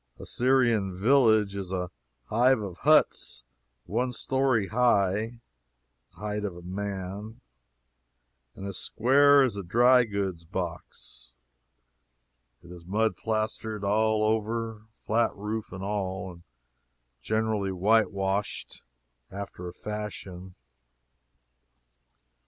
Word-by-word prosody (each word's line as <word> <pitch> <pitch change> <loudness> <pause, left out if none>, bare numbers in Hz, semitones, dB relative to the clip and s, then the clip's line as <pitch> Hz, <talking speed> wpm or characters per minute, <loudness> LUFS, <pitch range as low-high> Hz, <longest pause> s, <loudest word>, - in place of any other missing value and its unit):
A - - -10
Syrian 120 -7 +2
village 110 -3 +4
is 95 -2 -5
a 90 -2 -3 0.3
hive 125 - +3
of 100 -5 -6
huts - - +2 0.4
one 125 +4 -1
story 130 -4 0
high 110 -1 +1 0.7
(the - - -25
height 105 +2 -3
of 95 -4 -4
a 90 - -11
man,) 100 +3 -5 1.2
and 95 - -8
as 100 -2 -4
square 140 +4 +5
as 125 -6 0
a - - -2
dry 120 +7 +4
goods 100 -5 -3
box; - - -7 1.3
it 90 - -13
is 90 -1 -11
mud 105 +3 0
plastered 110 -1 -3
all 110 +2 +2
over, 110 0 -1
flat 115 +1 0
roof 105 +2 -4
and 95 0 -7
all, 95 -2 -3
and 85 -1 -15 0.8
generally 110 - 0
whitewashed 100 0 0 0.5
after 95 -2 -7
a - - -5
fashion. 95 -3 -7
105 Hz, 105 wpm, -27 LUFS, 95-115 Hz, 1.3 s, square